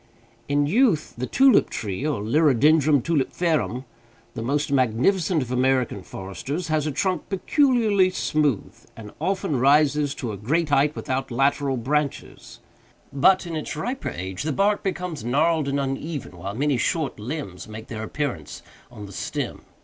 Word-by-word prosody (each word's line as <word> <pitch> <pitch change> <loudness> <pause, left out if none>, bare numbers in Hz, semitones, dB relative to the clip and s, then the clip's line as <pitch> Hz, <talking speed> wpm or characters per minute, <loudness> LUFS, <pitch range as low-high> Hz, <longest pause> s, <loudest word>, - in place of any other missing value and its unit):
In 145 0 +2
youth, 190 - +2
the 125 +2 -4
tulip 265 -3 +4
tree, 115 +4 -3
or 115 -10 -2
Liriodendron 145 +2 +4
Tulipferum, 155 -3 0 0.5
the - - -5
most 140 +5 -1
magnificent 140 - +2
of 125 - -8
American 125 -4 +1
foresters, 115 - -6
has 155 -1 +1
a - - -1
trunk 185 +6 -1
peculiarly 215 -3 +3
smooth, 150 - 0 0.2
and 105 -2 -9
often 170 -6 -1
rises 145 +1 +3
to 120 -4 -4
a 100 - -6
great 150 - 0
height 145 +2 +3
without 130 +1 -3
lateral 135 +2 +1
branches; 140 +4 -3 0.5
but, 185 +8 +4
in 170 -2 -5
its 155 - -4
riper 245 - -3
age, 95 +3 -5
the 155 - -1
bark 200 +7 +2
becomes 180 - -4
gnarled 150 +5 +1
and 140 0 0
uneven, 135 - -4
while 95 +4 -6
many 140 +1 +1
short 155 +3 -1
limbs 105 - -6
make 110 +1 -8
their 110 -2 -6
appearance 115 - -4 0.3
on 110 -4 -10
the 100 - -11
stem. - - -4
145 Hz, 150 wpm, -24 LUFS, 120-160 Hz, 0.5 s, tulip